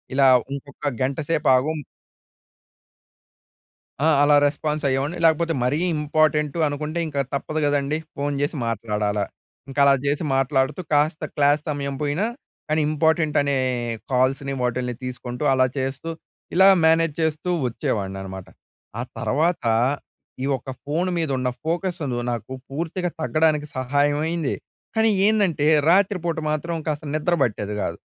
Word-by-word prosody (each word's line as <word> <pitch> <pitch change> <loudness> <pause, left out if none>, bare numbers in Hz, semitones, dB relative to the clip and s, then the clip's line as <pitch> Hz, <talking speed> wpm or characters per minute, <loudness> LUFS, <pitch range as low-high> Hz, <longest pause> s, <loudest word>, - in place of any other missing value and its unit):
ఇలా 135 0 +5 0.3
ఇంకొక 140 +1 -5
గంట 135 +3 -1
సేపు 155 -2 +1
ఆగుం 150 +5 +1 2.3
ఆ! - - +4 0.2
అలా 145 0 +5
రెస్పాన్స్ 150 +1 -2
అయ్యేవాడ్ని. 140 +6 -1
లేకపోతే 165 +1 +3
మరీ 135 +5 +1 0.2
ఇంపార్టెంటు 150 +1 +1
అనుకుంటే, 150 +3 -3
ఇంక 145 -3 -4 0.2
తప్పదు 155 +3 -2
కదండీ. 145 +1 +1 0.2
ఫోన్ 145 0 -1
చేసి 145 +2 -1
మాట్లాడాల. 105 -2 -1 0.5
ఇంకలా 140 0 +5
చేసి 145 +3 0
మాట్లాడుతూ, 135 +2 +1
కాస్త 150 +2 +2
క్లాస్ 145 +1 +3
సమయం 140 -1 -3
పోయిన 150 +6 0 0.5
కానీ, 155 +1 +1
ఇంపార్టెంట్ 160 0 +2
అనే 140 0 0 0.6
కాల్స్‌ని 135 +2 +1
వాటిల్ని 125 0 -1
తీసుకుంటూ, 125 +1 -5
అలా 130 -1 +4
చేస్తూ, 135 +5 -3 0.4
ఇలా 190 +2 +6 0.2
మేనేజ్ 165 -1 +4
చేస్తూ 160 +2 -1 0.2
వచ్చేవాడ్ని 100 -5 -2
అన్నమాట. 95 -1 -7 0.5
ఆ - - -1 0.2
తర్వాత 160 +6 0 0.8
ఈ - - 0
ఒక్క 130 +1 -8
ఫోన్ 165 +6 -1
మీద 160 -3 -1
ఉన్న 125 0 0 0.2
ఫోకస్ను 165 -6 -2
నాకు 120 +2 -4 0.2
పూర్తిగా 170 +4 -2
తగ్గడానికి 155 -1 +2
సహాయం 145 +3 +1
అయింది. 165 -4 -1 0.4
కానీ 220 0 +3 0.2
ఏందంటే, 195 -9 +2 0.2
రాత్రిపూట 180 -3 +2
మాత్రం 160 +3 -2
కాస్త 150 0 -2
నిద్ర 165 +3 +1
పట్టేది 105 -2 -1
కాదు. - - -3
145 Hz, 130 wpm, -23 LUFS, 135-160 Hz, 2.3 s, ఇలా